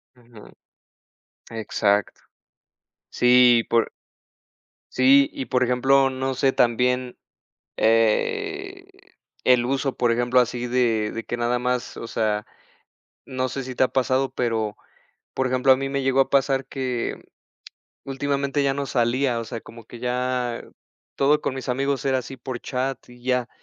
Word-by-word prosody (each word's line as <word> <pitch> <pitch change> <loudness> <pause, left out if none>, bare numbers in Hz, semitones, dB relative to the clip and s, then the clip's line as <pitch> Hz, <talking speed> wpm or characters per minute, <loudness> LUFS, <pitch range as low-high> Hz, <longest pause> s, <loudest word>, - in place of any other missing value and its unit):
Ujú. 120 -3 -16 1.0
Exacto. 105 -2 0 0.9
Sí 125 -1 +5
y - - -1
por 115 0 +1 1.0
Sí. 135 +2 +5
Y 130 - -5
por 125 0 0
ejemplo, 135 +2 +3
no 130 0 -3
sé 135 +1 +2
también, 125 +1 +1 0.6
eh, 390 - 0 0.6
el 125 -1 +4
uso, 135 +1 -1
por 120 -1 +1
ejemplo, 120 +1 +2
así 125 0 -1
de 115 -4 +1
de 115 - -5
que 120 - -4
nada 120 +1 0
más 125 0 -2
o 115 - -6
sea, 105 -2 -1 0.8
no 130 0 -2
sé 135 +2 -4
si 130 0 -7
te 130 - +3
ha - - +3
pasado, 130 0 0
pero, 110 -4 -2 0.6
por 130 - 0
ejemplo, 130 +1 +3
a - - +4
mí 135 +1 -3
me 140 0 -2
llegó 135 0 +2
a - - +1
pasar 135 -1 +2
que 130 -3 -3 0.8
últimamente 140 +1 -1
ya 135 -1 +1
no 140 0 -3
salía, 125 +1 0
o 115 - -5
sea, 115 -1 -6
como 115 -1 -13
que 120 - -12
ya 125 -1 -2 0.5
todo 145 +2 +3
con 130 - -3
mis 130 0 -7
amigos 135 +1 -1
era 130 -1 +2
así 130 +2 -7
por 130 -2 -6
chat 130 +1 -3
y 120 0 -16
ya. 125 -1 0
125 Hz, 150 wpm, -23 LUFS, 120-135 Hz, 1.0 s, Sí